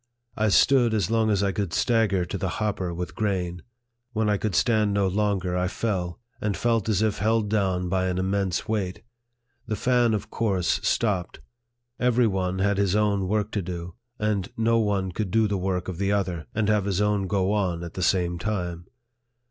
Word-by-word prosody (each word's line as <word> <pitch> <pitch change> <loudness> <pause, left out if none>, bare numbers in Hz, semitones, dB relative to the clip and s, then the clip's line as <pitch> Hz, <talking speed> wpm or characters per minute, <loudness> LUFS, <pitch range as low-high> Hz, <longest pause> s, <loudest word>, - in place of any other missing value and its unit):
I 110 0 +1
stood 120 +1 +4
as 105 -1 0
long 110 -1 +2
as 100 -2 +2
I 100 - +2
could 100 -2 -3
stagger 110 -6 +2
to 85 - -6
the 95 - -1
hopper 100 -4 -1
with 90 +1 -5
grain. 90 -5 -2 0.5
When 110 -1 +1
I 105 - +2
could 100 -2 -2
stand 110 0 +2
no 100 -1 +2
longer, 95 -2 0
I 90 0 +1
fell, 95 -3 -2 0.2
and 105 -2 -1
felt 115 -2 +1
as 105 0 +2
if 110 -2 0
held 110 0 +1
down 95 -4 +1
by 95 0 0
an 90 -1 -1
immense 95 -1 -1
weight. 100 -4 -2 0.6
The 110 - -1
fan 120 -1 +2
of 105 - -5
course 95 -6 0
stopped; 100 -6 0 0.6
every 125 0 +3
one 95 -3 0
had 100 +1 +1
his 100 -1 +2
own 100 -3 +1
work 105 +1 0
to 105 - -1
do; 85 -1 -6 0.2
and 105 -3 -1
no 115 0 +3
one 100 -4 0
could 105 +2 -3
do 110 +2 +3
the 100 - -1
work 90 -1 -2
of 95 -2 -5
the 100 0 +1
other, 90 -5 -1
and 110 -1 +1
have 105 -2 +2
his 100 -2 0
own 105 -2 +1
go 95 -1 +1
on 90 -5 0
at 85 - -7
the 95 - -5
same 90 -1 +1
time. 90 -4 -3
100 Hz, 195 wpm, -25 LUFS, 90-110 Hz, 0.6 s, stood